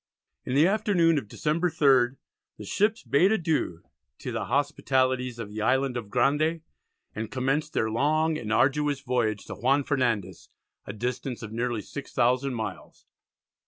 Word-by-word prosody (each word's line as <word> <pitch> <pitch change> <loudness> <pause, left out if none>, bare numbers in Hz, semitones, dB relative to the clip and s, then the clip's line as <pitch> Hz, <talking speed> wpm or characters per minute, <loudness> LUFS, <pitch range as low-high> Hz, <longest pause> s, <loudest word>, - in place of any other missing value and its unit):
In 125 - -2
the 150 +3 +6
afternoon 185 -6 +3
of 110 - -11
December 160 - 0
3rd, 135 -4 +3 0.4
the - - -9
ships 215 +2 0
bade 140 - +3
adieu 160 - -1 0.3
to - - -6
the - - -3
hospitalities 130 -2 0
of 115 -3 -6
the 105 +1 -5
island 130 +2 +1
of 115 -4 -5
Grande, 150 +8 +1 0.5
and 110 0 -5
commenced 135 +5 -1
their 110 0 0
long 155 +6 +1
and 110 -7 -4
arduous 140 +3 +2
voyage 120 -5 -1
to - - -7
Juan 135 +4 +2
Fernandez, 125 - -1 0.4
a 100 - -5
distance 125 +2 -4
of 110 - -7
nearly 115 -1 -2
6,000 130 -1 0
miles. 110 -8 -6
130 Hz, 150 wpm, -27 LUFS, 120-150 Hz, 0.5 s, the